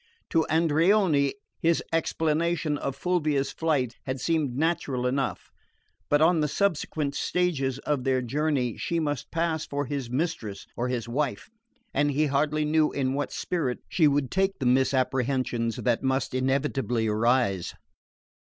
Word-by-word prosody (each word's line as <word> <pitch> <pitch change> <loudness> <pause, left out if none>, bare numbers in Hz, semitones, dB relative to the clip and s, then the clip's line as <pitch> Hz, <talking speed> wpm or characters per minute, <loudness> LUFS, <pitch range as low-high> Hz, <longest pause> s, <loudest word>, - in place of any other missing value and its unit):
To 160 -1 +2
Andreoni 160 -1 +3 0.2
his 170 -2 +2
explanation 165 0 0
of 140 -2 -3
Fulvia's 150 -3 0
flight 140 -7 -1
had 130 0 -2
seemed 150 -4 0
natural 145 -5 0
enough; 135 +1 -2 0.6
but 145 +1 +4
on 165 0 +4
the 150 - +2
subsequent 155 -4 -1
stages 140 -9 0
of 140 -2 -2
their 130 -1 +2
journey 135 -2 0
she 170 - -1
must 145 -4 -2
pass 165 -1 -1
for 145 0 -2
his 135 -3 -4
mistress 125 - -3
or 120 - -1
his 120 -2 -2
wife, 140 - -2 0.4
and 145 +1 +2
he 145 +2 +2
hardly 150 +2 +1
knew 155 0 +2
in 130 -2 -1
what 145 +1 -2
spirit 145 -9 -2
she 160 -4 +4
would 140 -3 +1
take 195 +1 +1
the 135 - -3
misapprehensions 130 -2 +1
that 120 -2 0
must 130 -1 0
inevitably 130 -2 0
arise. 110 -3 +1
145 Hz, 140 wpm, -27 LUFS, 130-160 Hz, 0.6 s, but